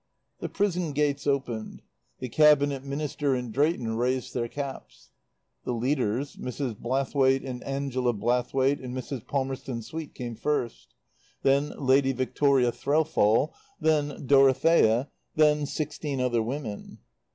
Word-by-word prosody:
The - - -4
prison 180 -6 -1
gates 145 0 0
opened. 125 -6 -2 0.3
The - - -5
Cabinet 145 0 +4
Minister 140 0 -1
and 125 -3 -4
Drayton 130 -6 +1
raised 125 +1 -1
their 120 -1 -1
caps. 140 +1 -7 0.5
The - - -2
leaders, 125 +1 -1
Mrs. 125 -1 -4
Blathwaite 135 +3 +1
and 125 -1 -6
Angela 135 -3 -1
Blathwaite 125 +5 +1
and 125 0 -5
Mrs. 130 -2 -6
Palmerston 130 -3 -3
Swete 160 +4 -7
came 120 -2 -5
first. 125 -1 -3 0.5
Then 140 +2 +2
Lady 135 0 +3
Victoria 130 0 +2
Threlfall. 145 -3 +2 0.3
Then 150 -3 0
Dorothea. 135 -2 +4 0.2
Then 150 -1 +3
sixteen 150 -2 -3
other 120 -2 +1
women. 115 -3 -5
135 Hz, 120 wpm, -27 LUFS, 125-145 Hz, 0.5 s, Cabinet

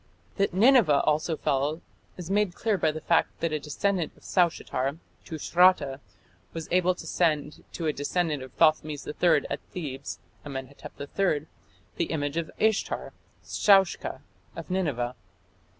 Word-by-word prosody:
That 200 -1 +2
Nineveh 200 - +5
also 155 +1 +1
fell 145 +4 0 0.4
is 180 0 -6
made 205 -3 +1
clear 220 -2 0
by 160 -5 +1
the 155 +1 -7
fact 170 +1 +1
that 165 - -1
a 155 - 0
descendant 175 +3 -2
of - - -22
Saushatar 160 -6 0 0.3
(Tushratta) 165 -3 +3 0.5
was 165 -1 -5
able 180 0 +3
to - - -10
send 150 -4 0
to 170 - -4
a 155 - +1
descendant 150 0 -1
of 130 -1 -9
Thothmes 155 -2 +2
III 160 -1 +3
at - - -2
Thebes 140 -6 -5 0.3
(Amenhotep 135 -1 -8
III) 150 0 0 0.5
the 170 - +1
image 145 -1 -2
of 165 -1 -2
Ishtar 220 -1 0 0.3
(Shaushka) 195 -3 +3 0.3
of - - -7
Nineveh. 140 -10 -1
160 Hz, 140 wpm, -27 LUFS, 145-180 Hz, 0.5 s, Nineveh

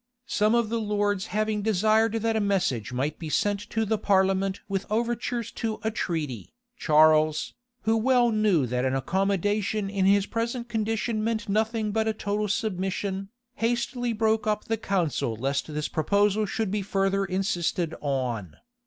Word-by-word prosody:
Some 215 0 +2
of 235 -2 +1
the 230 0 -1
lords 205 -2 0
having 215 +1 -1
desired 220 +2 +2
that 225 0 0
a - - +2
message 185 - 0
might 135 +5 -2
be 160 - -5
sent 205 +4 +1
to 225 -1 0
the 215 0 0
parliament 195 0 +2
with 195 -1 -2
overtures 235 +1 -1
to 220 -2 -2
a 220 - 0
treaty, 155 - -4 0.2
Charles, 155 -3 +3 0.3
who 220 +1 +2
well 240 +1 +3
knew 210 -9 +2
that 125 +1 -1
an 130 0 +1
accommodation 195 - 0
in 195 -2 +1
his 200 0 +4
present 235 +2 -3
condition 225 0 -1
meant 225 -1 -1
nothing 215 +1 0
but 220 +1 0
a 220 - +1
total 210 0 -2
submission, 195 -1 -2 0.3
hastily 240 +1 -1
broke 220 -1 +1
up 210 0 0
the 225 - -1
council 175 - -1
lest 135 +3 -1
this 150 0 -3
proposal 205 +5 +1
should 215 -1 -2
be 210 0 0
further 195 0 0
insisted 180 -3 -1
on. 125 - -2
205 Hz, 160 wpm, -26 LUFS, 180-220 Hz, 0.3 s, his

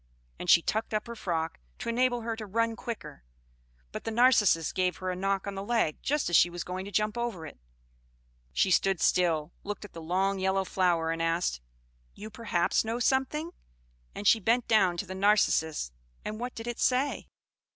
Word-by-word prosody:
And 180 - -5
she 170 - +7
tucked 220 0 -1
up 215 - -1
her 235 0 -7
frock, 165 -6 -3 0.2
to - - -7
enable 245 +1 +1
her 225 0 -3
to 220 -1 -7
run 230 +3 0
quicker; 230 - -7 0.7
but - - -6
the - - -3
Narcissus 225 -8 +4
gave 180 -2 0
her 185 0 -3
a - - -3
knock 195 +1 -1
on 200 - -4
the 195 - -5
leg, 220 -8 0
just 295 0 0
as 175 - +1
she 175 - +6
was 175 0 -5
going 185 +1 -5
to 200 - -8
jump 210 +3 0
over 225 -9 -3
it. 150 - -11
So - - -39 0.9
she 190 - +2
stood 195 0 +3
still, 165 -4 +1
looked 205 0 -5
at 205 - -14
the 165 - -8
long 190 +4 0
yellow 190 0 +1
flower, 175 -3 +1
and 165 0 -3
asked, 165 - 0 0.5
"You 215 +2 -9
perhaps 205 -6 0
know 225 +1 -2
something?" 265 +6 0 0.6
and 205 - -6
she 225 +3 +6
bent 230 +4 +1
down 190 -6 +3
to - - -3
the 185 - -7
Narcissus. 190 - +2 0.3
And 215 +1 -4
what 245 +1 -5
did 225 - -7
it 240 -1 -4
say? 265 +3 +1
200 Hz, 200 wpm, -29 LUFS, 175-230 Hz, 0.9 s, she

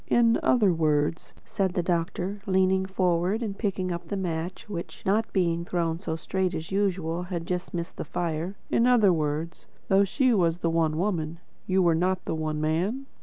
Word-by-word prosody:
"In 230 -1 +4
other 210 -7 +4
words," 155 -1 0
said 190 -4 -1
the 175 - +1
doctor, 180 +3 -2
leaning 190 0 +2
forward 185 +3 +1
and 205 -3 -3
picking 190 -3 -2
up 170 -1 -5
the 200 - -3
match 180 +3 -4
which, 175 -5 -7
not 215 +4 +1
being 170 -3 +1
thrown 170 -2 -1
so 160 -4 -3
straight 185 +2 -1
as 160 +2 -6
usual, 185 -4 0
had 175 -2 -4
just 180 0 -3
missed 170 -1 -5
the - - -3
fire; 170 +3 -3 0.2
"in 235 - +3
other 220 -7 +5
words, 155 +1 -3 0.2
though 195 +1 +5
She 250 +6 +2
was 170 -5 +2
the 170 -2 0
One 160 -2 +1
Woman, 170 -4 -1 0.3
you 190 0 +3
were 170 -1 +4
not 180 +3 0
the - - -2
One 155 -1 -2
Man?" 180 - 0
180 Hz, 185 wpm, -27 LUFS, 165-195 Hz, 0.3 s, other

